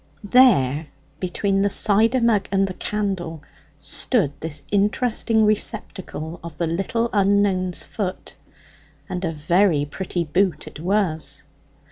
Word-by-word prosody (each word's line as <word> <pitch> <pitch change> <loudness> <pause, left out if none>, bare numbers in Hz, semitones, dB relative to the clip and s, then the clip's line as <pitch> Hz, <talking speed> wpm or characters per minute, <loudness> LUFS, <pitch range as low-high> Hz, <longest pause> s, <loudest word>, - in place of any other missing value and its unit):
There, 175 - +4 0.3
between 195 +2 0
the 200 - +2
cider 220 +5 +3
mug 220 -4 +2
and 195 0 +3
the 185 - -5
candle, 185 -7 -3 0.3
stood 145 -1 0
this 150 -2 -4
interesting 220 +2 +1
receptacle 190 -6 -2
of 165 -3 -9
the 170 - 0
little 195 +8 -1
unknown's 195 -3 +2
foot; 195 -3 -5 0.7
and 180 0 -4
a 165 - 0
very 160 0 +2
pretty 175 +3 -3
boot 170 0 0
it - - -10
was. 175 -3 0
190 Hz, 120 wpm, -22 LUFS, 165-205 Hz, 0.7 s, There